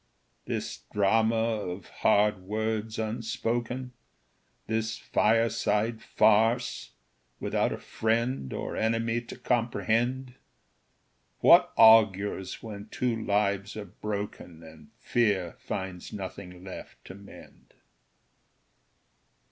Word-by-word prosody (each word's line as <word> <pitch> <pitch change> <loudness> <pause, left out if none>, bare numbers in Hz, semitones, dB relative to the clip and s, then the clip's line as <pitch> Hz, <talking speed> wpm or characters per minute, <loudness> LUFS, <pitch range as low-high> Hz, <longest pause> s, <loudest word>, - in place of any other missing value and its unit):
This - - -4
drama 110 +3 +3
of 105 -5 -2
hard 105 0 +3
words 110 +3 -3
unspoken, 115 +3 -3 0.7
This 110 0 -2
fireside 110 0 +1
farce, 115 +3 +2 0.5
without - - 0
a - - -3
friend 115 - -1
Or - - -4
enemy 115 +1 0
to 115 - -10
comprehend 120 +2 0 1.1
What - - +7
augurs 105 -4 +5
when 105 -2 -8
two 125 0 -1
lives 100 -1 -1
are 105 - -5
broken, 100 -4 -6
And 80 -2 -14
fear 100 -7 0
finds 95 -2 -5
nothing 95 -2 -8
left 95 - -10
to - - -9
mend. 100 +1 -15
110 Hz, 90 wpm, -28 LUFS, 100-115 Hz, 1.1 s, What